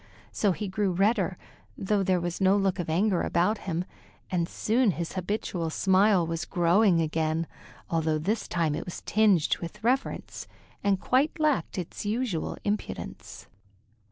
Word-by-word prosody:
So 205 - +1
he 205 +3 -3
grew 190 0 0
redder, 195 -1 +1 0.4
though 200 +1 0
there 185 -1 +2
was 175 +2 -4
no 190 +1 +4
look 195 -1 0
of 170 - -3
anger 185 +3 +2
about 185 +6 +1
him, 175 -1 -3 0.5
and 170 -2 0
soon 235 +2 +1
his 170 -2 -3
habitual 185 -3 -2
smile 190 +1 +3
was 165 +1 -3
growing 175 +1 +3
again, 160 0 0 0.4
although 160 -1 0
this 200 +9 -1
time 165 -3 0
it 155 - -3
was 180 - -7
tinged 205 -7 +3
with 190 +5 -8
reverence 255 +4 -1 0.4
and 200 -2 +2
quite 270 +9 +1
lacked 300 - +1
its 180 -3 -5
usual 215 -5 -2
impudence. 205 0 -5
185 Hz, 150 wpm, -27 LUFS, 170-210 Hz, 0.5 s, no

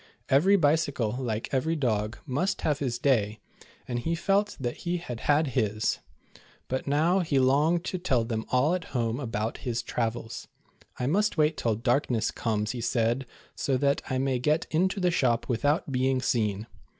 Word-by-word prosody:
Every 170 +10 +5
bicycle, 145 - +1
uke 110 +5 -4
every 160 +5 +1
dog, 110 -5 -1
must 155 +8 -1
have 145 -2 0
his 125 -4 -1
day, 115 -5 +1 0.5
and 120 -1 -2
he 165 +7 -1
felt 200 +4 +1
that 120 -2 -3
he 175 0 -2
had 125 -9 -6
had 145 +2 +2
his; 110 -3 0 0.7
but 130 +2 -3
now, 160 +7 +3
he 155 -6 0
longed 145 +6 +3
to 185 - -3
tell 130 -10 +1
them 110 -1 -2
all 130 +6 +3
at 180 -2 -2
home 115 +1 0
about 110 -4 -3
his 120 -1 -2
travels. 115 -1 -3 0.2
" - - -31
I 125 - -1
must 205 +8 +1
wait 155 0 +3
till 115 -2 0
darkness 120 0 +1
comes," 110 -2 -1
he 125 - -5
said, 120 +2 0 0.3
"so 135 -2 0
that 140 +1 +1
I 130 - 0
may 130 -1 0
get 150 +6 +1
into 185 +5 +1
the 180 -1 +2
shop 125 -8 +1
without 145 +5 0
being 130 0 +1
seen." 110 -4 0
130 Hz, 175 wpm, -27 LUFS, 115-155 Hz, 0.7 s, Every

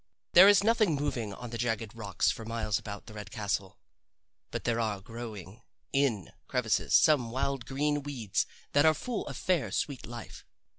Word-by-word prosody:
There 185 +3 +10
is 205 -1 +6
nothing 215 -6 +3
moving 130 -7 -2
on 120 +4 -8
the 115 - -5
jagged 115 -2 -1
rocks 105 -4 0
for 115 - -7
miles 110 -2 -1
about 100 -1 -8
the 110 - -11
red 105 -2 -8
castle, 100 -2 -3 0.7
but - - -4
there 115 -1 0
are 110 -3 -1
growing 110 -2 -8 0.3
in 130 - +1 0.2
crevices - - +1
some 140 -7 +5
wild 130 0 -2
green 145 +2 0
weeds 120 -10 -2 0.2
that 145 - +4
are 160 0 +5
full 240 - -4
of - - -6
fair 180 -5 +1
sweet 140 -4 -2
life. 120 -1 -9
120 Hz, 170 wpm, -30 LUFS, 105-145 Hz, 0.7 s, There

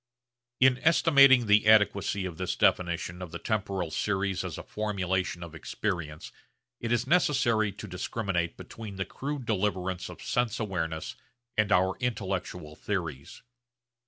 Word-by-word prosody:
In 130 -1 +5
estimating 140 -6 +6
the 105 0 +4
adequacy 105 -2 +4
of 90 -3 -6
this 90 -1 -2
definition 90 0 +1
of 90 - -6
the 85 - -6
temporal 95 -3 -2
series 95 -1 -1
as - - -5
a - - -7
formulation 95 -4 -2
of 85 -1 -9
experience 80 -1 -4 0.5
it 115 - -3
is 120 0 +1
necessary 125 - +2
to 105 +2 -9
discriminate 90 -2 -2
between 110 -3 -9
the 95 0 -2
crude 140 -2 -5
deliverance 95 -4 -1
of - - -10
sense 120 -3 0
awareness 80 -6 -3 0.4
and 105 -1 +2
our 95 0 +3
intellectual 95 -9 -3
theories. 85 -10 -5
100 Hz, 135 wpm, -28 LUFS, 90-110 Hz, 0.5 s, estimating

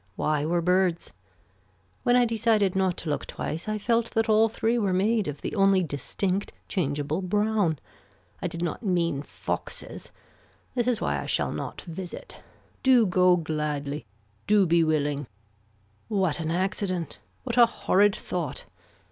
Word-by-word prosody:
Why 150 -1 0
were 170 +1 +1
birds. 180 -1 +1 0.9
When 245 - +3
I 250 -1 +5
decided 220 -4 +2
not 190 -2 +1
to 165 - -5
look 145 - -3
twice 165 +7 -4
I 215 - -1
felt 230 +2 +1
that 225 0 +2
all 220 +1 +4
three 230 +2 0
were 200 -4 +1
made 210 +3 +2
of 145 -1 -5
the - - -4
only 195 -2 +4
distinct 180 +6 -2 0.2
changeable 150 -1 -1
brown. 205 -3 +1 0.6
I - - -1
did 170 0 -4
not 170 - -3
mean 175 -8 0
foxes. - - -5 0.6
This 245 -2 0
is 240 -3 +1
why - - 0
I - - -7
shall - - +1
not - - -5
visit. 180 - -8 0.4
Do 255 -4 +5
go 180 -1 +4
gladly. 150 -5 -3 0.4
Do 205 -2 +5
be 170 0 +4
willing. 145 -3 0 0.8
What 190 -7 0
an 160 -1 -2
accident. 185 -1 -2 0.2
What 240 -2 -3
a 235 - +8
horrid 205 -3 +2
thought. 170 -7 -4
185 Hz, 150 wpm, -26 LUFS, 160-215 Hz, 0.9 s, a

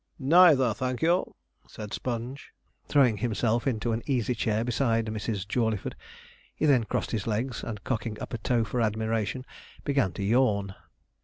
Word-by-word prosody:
'Neither, 145 -4 +6
thank 130 +4 -3
you,' 175 +3 +1 0.3
said 105 -2 -8
Sponge, 125 +3 -5 0.3
throwing 130 -7 +4
himself 115 +2 0
into 120 -2 0
an 115 +1 -1
easy 125 -3 +1
chair 110 -1 0
beside 115 -2 +1
Mrs. 110 -2 -3
Jawleyford. 110 -3 -1 0.6
He - - 0
then 130 -6 +4
crossed - - -2
his 110 -3 -2
legs, 115 +2 -2
and 105 -4 -6
cocking 115 -3 -3
up - - -7
a 120 - -3
toe 115 +1 +1
for 120 +2 -2
admiration, 110 +2 -1 0.4
began 135 -9 +1
to 100 - -4
yawn. 100 -3 +2
115 Hz, 155 wpm, -27 LUFS, 110-130 Hz, 0.6 s, Neither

